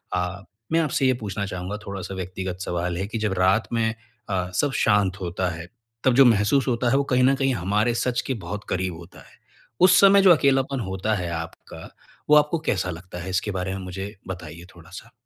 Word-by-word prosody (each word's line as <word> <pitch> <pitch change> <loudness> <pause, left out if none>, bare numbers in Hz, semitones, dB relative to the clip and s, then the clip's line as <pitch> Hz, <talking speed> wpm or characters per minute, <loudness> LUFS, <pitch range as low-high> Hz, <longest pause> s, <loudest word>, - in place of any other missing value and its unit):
अ, 90 +2 -3 0.3
मैं 165 - +3
आपसे 145 -4 0
ये 130 - +4
पूछना 100 -1 -3
चाहूँगा 95 +2 -5
थोड़ा-सा 95 -1 -6
व्यक्तिगत 95 0 -5
सवाल 90 -1 -2
है 95 +2 -3
कि 110 +2 -4
जब 105 -3 -1
रात 95 +4 +3
में 115 -1 +1 0.4
अ, 90 -2 -1
सब 145 -2 +1
शांत 100 -2 +2
होता 90 +1 -2
है, 85 0 -7 0.4
तब 130 - +4
जो 135 - +7
महसूस 115 +4 +3
होता 120 0 +1
है 135 - +3
वो 140 - +2
कहीं 125 0 +4
न 135 +1 +4
कहीं 135 -1 +1
हमारे 105 +4 0
सच 125 +1 0
के 135 - 0
बहुत 105 0 -5
करीब 90 -1 -1
होता 85 +2 -13
है। - - -23 0.4
उस 180 -1 +7
समय 200 0 +7
जो 190 -2 +7
अकेलापन 135 -3 +2
होता 95 0 -2
है 90 -3 -3
आपका, 80 0 -8 0.4
वो 150 - +7
आपको 150 +2 +3
कैसा 95 -1 0
लगता 90 +1 -9
है 95 - -6
इसके 95 +3 -1
बारे 95 0 -3
में 95 - -5
मुझे 95 +3 -6
बताइए 85 -2 -8
थोड़ा-सा? 85 -2 -12
100 Hz, 210 wpm, -24 LUFS, 90-125 Hz, 0.4 s, जो